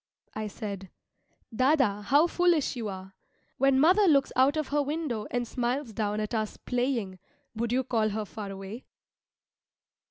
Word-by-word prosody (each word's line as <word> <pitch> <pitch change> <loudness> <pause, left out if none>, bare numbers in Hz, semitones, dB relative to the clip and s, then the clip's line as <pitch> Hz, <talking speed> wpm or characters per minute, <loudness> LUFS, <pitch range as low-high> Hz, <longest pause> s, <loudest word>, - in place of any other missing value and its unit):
I 215 0 -4
said, 200 -3 -6 0.7
"Dâdâ 255 -6 +2
how 285 +8 +5
foolish 345 -5 +2
you 230 -3 -4
are! 190 0 -8 0.5
When 270 0 +4
mother 375 +7 +5
looks 280 -4 +4
out 270 +4 +4
of 310 -3 -2
her 295 +1 +2
window 285 -7 -3
and 245 -1 -2
smiles 245 0 -2
down 210 0 -1
at 215 +2 -3
us 215 -2 -2
playing, 245 -7 -2 0.3
would 230 +1 -2
you 260 +1 +2
call 225 -4 +1
her 215 +1 -3
far 210 0 -7
away?" 195 +5 -8
240 Hz, 155 wpm, -28 LUFS, 210-275 Hz, 0.7 s, how